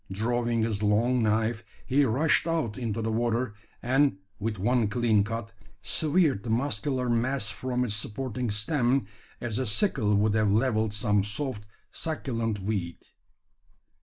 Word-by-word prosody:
Drawing 115 Hz, +2 st, 0 dB
his 110 Hz, -2 st, -1 dB
long 115 Hz, +4 st, +2 dB
knife, 110 Hz, +1 st, +1 dB, 0.2 s
he 140 Hz, +3 st, +3 dB
rushed 150 Hz, +8 st, +2 dB
out 160 Hz, -10 st, -1 dB
into 115 Hz, -3 st, -3 dB
the 110 Hz, -, -1 dB
water; 115 Hz, 0 st, 0 dB, 0.3 s
and, 135 Hz, -2 st, +3 dB, 0.2 s
with 105 Hz, +1 st, -2 dB
one 120 Hz, +3 st, +2 dB
clean 110 Hz, -1 st, +2 dB
cut, 115 Hz, +1 st, -5 dB, 0.3 s
severed 155 Hz, -, +2 dB
the 115 Hz, -, -7 dB
muscular 125 Hz, +1 st, 0 dB
mass 120 Hz, -1 st, 0 dB
from 125 Hz, +3 st, -2 dB
its 110 Hz, -, -2 dB
supporting 115 Hz, +3 st, -3 dB
stem, 120 Hz, +3 st, +1 dB, 0.3 s
as 120 Hz, -1 st, -3 dB
a 130 Hz, -, -1 dB
sickle 105 Hz, -, +2 dB
would 105 Hz, +1 st, +2 dB
have 110 Hz, -2 st, +2 dB
levelled 110 Hz, -1 st, +2 dB
some 105 Hz, -1 st, +1 dB
soft 105 Hz, 0 st, -4 dB, 0.2 s
succulent 115 Hz, -9 st, -2 dB
weed. 95 Hz, -4 st, -3 dB
115 Hz, 140 wpm, -27 LUFS, 105-130 Hz, 0.3 s, he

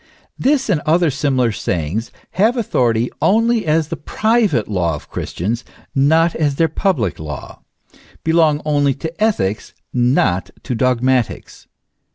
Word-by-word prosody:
This 270 Hz, 0 st, +2 dB
and 175 Hz, -8 st, +1 dB
other 165 Hz, 0 st, +2 dB
similar 130 Hz, -4 st, +1 dB
sayings 95 Hz, +2 st, -2 dB, 0.2 s
have 220 Hz, +7 st, +2 dB
authority 120 Hz, -, +1 dB
only 230 Hz, -1 st, +2 dB
as 155 Hz, 0 st, +1 dB
the -, -, -3 dB
private 215 Hz, -, +1 dB
law 85 Hz, -6 st, 0 dB
of 75 Hz, -, -12 dB
Christians, 115 Hz, +7 st, -3 dB, 0.3 s
not 160 Hz, +5 st, +3 dB
as 145 Hz, -3 st, 0 dB
their 165 Hz, +3 st, +3 dB
public 155 Hz, -, -1 dB
law; 75 Hz, -4 st, -8 dB, 0.6 s
belong 160 Hz, -2 st, +2 dB
only 145 Hz, -3 st, +2 dB
to 165 Hz, +7 st, -4 dB
ethics, 105 Hz, -, -1 dB, 0.2 s
not 120 Hz, -7 st, +1 dB
to -, -, -3 dB
dogmatics. 125 Hz, 0 st, 0 dB
145 Hz, 130 wpm, -18 LUFS, 115-170 Hz, 0.6 s, not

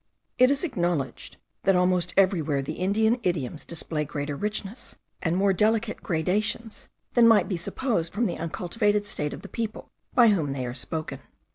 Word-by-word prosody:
It 255 Hz, 0 st, +7 dB
is 280 Hz, +3 st, +1 dB
acknowledged, 175 Hz, -, -2 dB, 0.2 s
that 195 Hz, -, +3 dB
almost 180 Hz, -1 st, +2 dB
everywhere 160 Hz, -8 st, +3 dB
the 145 Hz, -, -4 dB
Indian 220 Hz, +7 st, +2 dB
idioms 160 Hz, -, -2 dB
display 160 Hz, -2 st, -3 dB
greater 145 Hz, 0 st, -4 dB
richness, 210 Hz, -, -4 dB, 0.3 s
and 170 Hz, 0 st, 0 dB
more 195 Hz, 0 st, +3 dB
delicate 220 Hz, +3 st, +1 dB
gradations, 210 Hz, +6 st, -1 dB, 0.2 s
than 235 Hz, -2 st, +6 dB
might 225 Hz, -2 st, +5 dB
be 195 Hz, -, -1 dB
supposed 170 Hz, 0 st, -2 dB
from 230 Hz, +5 st, 0 dB
the 175 Hz, -, -2 dB
uncultivated 205 Hz, +5 st, 0 dB
state 150 Hz, -7 st, -3 dB
of -, -, -8 dB
the -, -, -7 dB
people 225 Hz, -2 st, -5 dB, 0.2 s
by 235 Hz, -2 st, +7 dB
whom 160 Hz, -9 st, +1 dB
they 130 Hz, -2 st, -3 dB
are 120 Hz, -, -4 dB
spoken. 155 Hz, +4 st, -5 dB
185 Hz, 165 wpm, -26 LUFS, 160-220 Hz, 0.3 s, It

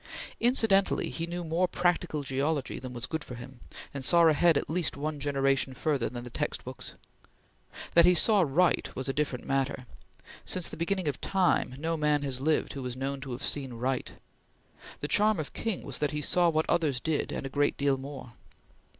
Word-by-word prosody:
Incidentally 225 Hz, -5 st, +3 dB
he 165 Hz, 0 st, -4 dB
knew 175 Hz, +1 st, -4 dB
more 170 Hz, +3 st, +1 dB
practical 175 Hz, -4 st, 0 dB
geology 140 Hz, +1 st, -1 dB
than 130 Hz, 0 st, -7 dB
was 120 Hz, -1 st, -5 dB
good 160 Hz, -2 st, -4 dB
for 125 Hz, -, -8 dB
him, 125 Hz, +1 st, -11 dB, 0.3 s
and 140 Hz, -2 st, -4 dB
saw 170 Hz, +5 st, +5 dB
ahead 160 Hz, 0 st, +5 dB
at -, -, -1 dB
least 165 Hz, -2 st, -1 dB
one 150 Hz, +1 st, -3 dB
generation 135 Hz, -1 st, +1 dB
further 140 Hz, -3 st, 0 dB
than 120 Hz, +1 st, -7 dB
the 125 Hz, -, -9 dB
text -, -, -3 dB
books. -, -, -8 dB, 1.0 s
That 170 Hz, 0 st, +7 dB
he 180 Hz, -, +6 dB
saw 205 Hz, +4 st, +5 dB
right 170 Hz, +3 st, +2 dB
was 130 Hz, 0 st, -3 dB
a 135 Hz, -, 0 dB
different 140 Hz, -4 st, -2 dB
matter. 135 Hz, -1 st, -1 dB, 0.6 s
Since 180 Hz, -2 st, -1 dB
the -, -, -7 dB
beginning 185 Hz, +1 st, -1 dB
of 145 Hz, -, -2 dB
time 185 Hz, -9 st, +1 dB
no 165 Hz, +3 st, -2 dB
man 150 Hz, -1 st, +1 dB
has 130 Hz, -2 st, -2 dB
lived 155 Hz, +2 st, +1 dB
who 135 Hz, -, -6 dB
is 125 Hz, 0 st, -6 dB
known 135 Hz, +1 st, -3 dB
to 135 Hz, -2 st, -6 dB
have 130 Hz, +4 st, -6 dB
seen 135 Hz, -4 st, -2 dB
right; 125 Hz, +2 st, -2 dB, 0.9 s
the 145 Hz, -, -2 dB
charm 210 Hz, +2 st, +3 dB
of 155 Hz, -, -5 dB
King 225 Hz, -5 st, -3 dB
was -, -, -3 dB
that 150 Hz, -, +1 dB
he 150 Hz, +1 st, -3 dB
saw 175 Hz, +2 st, +3 dB
what 160 Hz, -1 st, 0 dB
others 150 Hz, -7 st, +1 dB
did 160 Hz, +1 st, -1 dB
and -, -, -4 dB
a -, -, -2 dB
great 145 Hz, +1 st, 0 dB
deal 140 Hz, -1 st, +2 dB
more. 135 Hz, -3 st, -9 dB
145 Hz, 200 wpm, -29 LUFS, 135-170 Hz, 1.0 s, That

